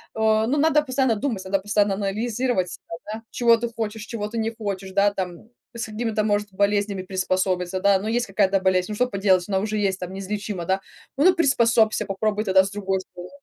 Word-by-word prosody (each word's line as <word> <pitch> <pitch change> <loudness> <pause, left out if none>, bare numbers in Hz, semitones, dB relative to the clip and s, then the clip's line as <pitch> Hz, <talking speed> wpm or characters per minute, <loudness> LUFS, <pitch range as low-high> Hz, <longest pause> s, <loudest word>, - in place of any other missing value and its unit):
Э, 220 0 +2
ну 285 +4 +1
надо 305 0 +4
постоянно 260 -3 +1
думать, 215 -5 -3
надо 195 0 +1
постоянно 205 0 +1
анализировать, 210 -1 -1
там, 210 +6 -7
да. - - -34
Чего 235 -1 +4
ты 235 0 -3
хочешь, 220 -1 -4
чего 210 -3 -4
ты 230 +2 -6
не 225 0 -1
хочешь, 195 -3 -4
да, 200 +1 +4
там 185 +2 -5 0.3
с 235 - -3
какими-то, 220 -1 -1
может, 205 -1 +1
болезнями 200 0 0
приспособиться, 185 -1 -1
да. 200 -1 +4
Ну 210 - -5
есть 240 +1 0
какая-то 195 0 +2
болезнь. 185 -1 +2
Ну 210 - -3
что 250 +3 +1
поделать? 195 -4 +2
Она 190 -1 +1
уже 215 +1 -2
есть, 195 -2 0
там, 180 0 -6
неизлечима, 195 -1 -4
да. 190 +2 +1 0.4
Ну 360 +6 +5
приспособься, 230 -8 +3
попробуй 210 +2 -1
тогда 190 0 +5
с 195 - -5
другой 195 -2 -1
стороны. 180 -1 -11
205 Hz, 200 wpm, -23 LUFS, 190-225 Hz, 0.4 s, Ну